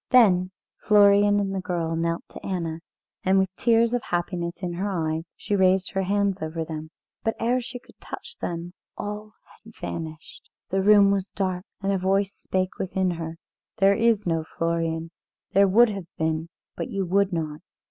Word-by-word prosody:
Then 185 -7 +5 0.3
Florian 205 -1 +5
and 195 -1 -1
the 190 - -2
girl 170 -3 -2
knelt 170 +1 -1
to - - -11
Anna, 170 -4 -3 0.4
and 190 +1 +3
with 190 -1 +1
tears 230 0 +3
of 245 - +1
happiness 175 0 -3
in 175 -1 -2
her 190 +4 -2
eyes 160 -3 -2
she 205 - -2
raised 190 -1 +3
her 195 - 0
hands 200 0 +1
over 160 +1 -3
them. 155 -1 -6 0.3
But 225 - 0
ere 245 +2 +1
she 245 +1 -7
could 245 - -19
touch - - -8
them 170 +1 -4 0.2
all 210 +1 -5 0.3
had 225 0 -15
vanished. 160 -1 -7 0.2
The 195 +1 +2
room 200 0 +6
was 195 -1 0
dark, 185 -1 -2 0.2
and 195 - +1
a 195 - +1
voice 195 +2 +1
spake 185 0 -2
within 190 -1 0
her: 165 -1 -5 0.4
"There 195 -1 +5
is 225 0 +2
no 165 -2 0
Florian; 165 0 -2 0.4
there 200 +1 +6
would 230 +5 +6
have 195 -5 -5
been, 160 +1 -1 0.3
but - - -4
you 195 -1 -1
would 200 +2 +2
not. 155 -3 -3
190 Hz, 180 wpm, -25 LUFS, 170-200 Hz, 0.4 s, room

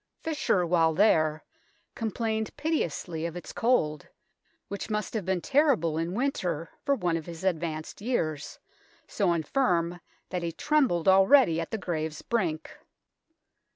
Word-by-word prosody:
Fisher 280 - +1
while 165 -2 +3
there 155 -6 +3 0.5
complained 220 0 -2
piteously 175 - -2
of 170 - -8
its 175 - -8
cold, 155 - +1 0.6
which 200 +2 -5
must 210 -1 -2
have 215 -5 -2
been 190 -2 0
terrible 265 - +2
in 165 +3 -2
winter 180 - -2
for 280 - +2
one 175 -8 0
of 160 - -8
his 170 0 -8
advanced 165 -2 -2
years, 155 - -2 0.5
so - - +1
infirm 170 - 0 0.3
that 180 - -2
he 170 -1 -2
trembled 255 - +1
already 190 - +6
at 165 - -5
the 220 - -2
grave's 160 -5 -4
brink. 175 -9 -1
175 Hz, 135 wpm, -28 LUFS, 165-220 Hz, 0.6 s, already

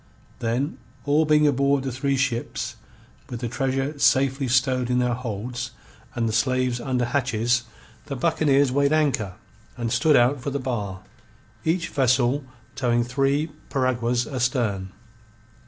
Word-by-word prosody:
Then, 125 +4 -1 0.3
all 150 +2 +3
being 150 0 +4
aboard 140 -1 +2
the 135 - -2
three 135 +2 0
ships, 130 -3 -2 0.5
with 120 - -5
the 120 - -1
treasure 135 +4 -2
safely 135 0 +3
stowed 125 0 +2
in 125 - +2
their 125 -1 +2
holds 120 +1 -5 0.4
and 115 -2 0
the 110 - -2
slaves 125 +1 +1
under 125 -1 0
hatches, 120 -2 0 0.4
the 140 - -4
buccaneers 145 -2 +2
weighed 140 +2 +2
anchor 135 -12 +1 0.4
and 120 -2 -2
stood 155 +2 +4
out 125 +3 +3
for 140 - -3
the 140 - -2
bar, 105 -8 -3 0.6
each 165 +2 0
vessel 130 +1 +2 0.3
towing 120 -2 +1
three 140 +5 0 0.2
piraguas 125 -2 0
astern. 115 -7 -1
130 Hz, 140 wpm, -24 LUFS, 120-140 Hz, 0.6 s, being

